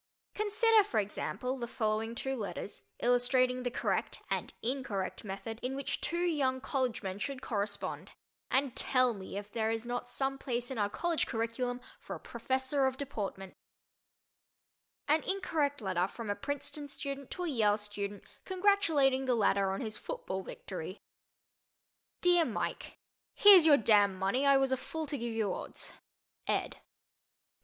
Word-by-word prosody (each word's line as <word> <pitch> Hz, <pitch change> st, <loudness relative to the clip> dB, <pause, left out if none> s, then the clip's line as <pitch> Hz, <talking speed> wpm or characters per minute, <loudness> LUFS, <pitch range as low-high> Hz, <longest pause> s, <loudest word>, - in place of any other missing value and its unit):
Consider, 430 Hz, +1 st, +4 dB
for 245 Hz, -, 0 dB
example, 250 Hz, +5 st, -3 dB
the 235 Hz, -, -3 dB
following 225 Hz, 0 st, -1 dB
two 265 Hz, +2 st, -2 dB
letters, 205 Hz, -3 st, -5 dB, 0.2 s
illustrating 250 Hz, +1 st, +3 dB
the 250 Hz, -, -1 dB
correct 245 Hz, -, -1 dB
and -, -, -1 dB
incorrect 230 Hz, -7 st, -2 dB
method 215 Hz, +3 st, -5 dB
in 255 Hz, +2 st, -2 dB
which 275 Hz, 0 st, -3 dB
two 345 Hz, +1 st, 0 dB
young 275 Hz, -6 st, +1 dB
college 255 Hz, -4 st, -1 dB
men 190 Hz, 0 st, -4 dB
should 270 Hz, +3 st, -4 dB
correspond, 205 Hz, -3 st, -3 dB, 0.4 s
and 265 Hz, -1 st, +1 dB
tell 255 Hz, -2 st, +3 dB
me 195 Hz, -1 st, -7 dB
if 205 Hz, 0 st, -6 dB
there 220 Hz, 0 st, 0 dB
is 225 Hz, +1 st, -2 dB
not 245 Hz, 0 st, -3 dB
some 270 Hz, +1 st, -1 dB
place 245 Hz, -1 st, -2 dB
in 255 Hz, -, -3 dB
our 205 Hz, -1 st, +2 dB
college 340 Hz, +7 st, 0 dB
curriculum 245 Hz, +2 st, -2 dB, 0.2 s
for -, -, -6 dB
a -, -, -8 dB
Professor 260 Hz, +3 st, 0 dB
of 260 Hz, 0 st, -2 dB
Deportment: 200 Hz, -9 st, -5 dB, 1.5 s
An 305 Hz, +2 st, +4 dB
Incorrect 310 Hz, -8 st, -1 dB
Letter 185 Hz, -3 st, +1 dB
from 220 Hz, +1 st, -5 dB
a -, -, -1 dB
Princeton 285 Hz, +2 st, -4 dB
Student 280 Hz, -1 st, -6 dB
to 360 Hz, -, -4 dB
a -, -, -1 dB
Yale 215 Hz, -8 st, +3 dB
Student 205 Hz, -1 st, -5 dB, 0.2 s
Congratulating 350 Hz, -9 st, +3 dB
the 250 Hz, -, +3 dB
Latter 200 Hz, -3 st, +3 dB
on 195 Hz, -, -2 dB
His 220 Hz, -3 st, -3 dB
Football 190 Hz, 0 st, -4 dB
Victory 185 Hz, 0 st, -7 dB, 1.2 s
DEAR 350 Hz, -1 st, +5 dB
MIKE: -, -, -3 dB, 0.4 s
Here's 385 Hz, -6 st, +9 dB
your 290 Hz, -2 st, +8 dB
damn 205 Hz, -4 st, +4 dB
money. 200 Hz, +9 st, +1 dB
I 275 Hz, 0 st, +7 dB
was 270 Hz, -1 st, +2 dB
a 260 Hz, -, +2 dB
fool 320 Hz, +4 st, -4 dB
to 285 Hz, 0 st, -3 dB
give 235 Hz, -1 st, -3 dB
you 210 Hz, -4 st, +1 dB
odds. -, -, -6 dB, 0.5 s
ED. -, -, 0 dB
250 Hz, 155 wpm, -32 LUFS, 215-280 Hz, 1.5 s, Here's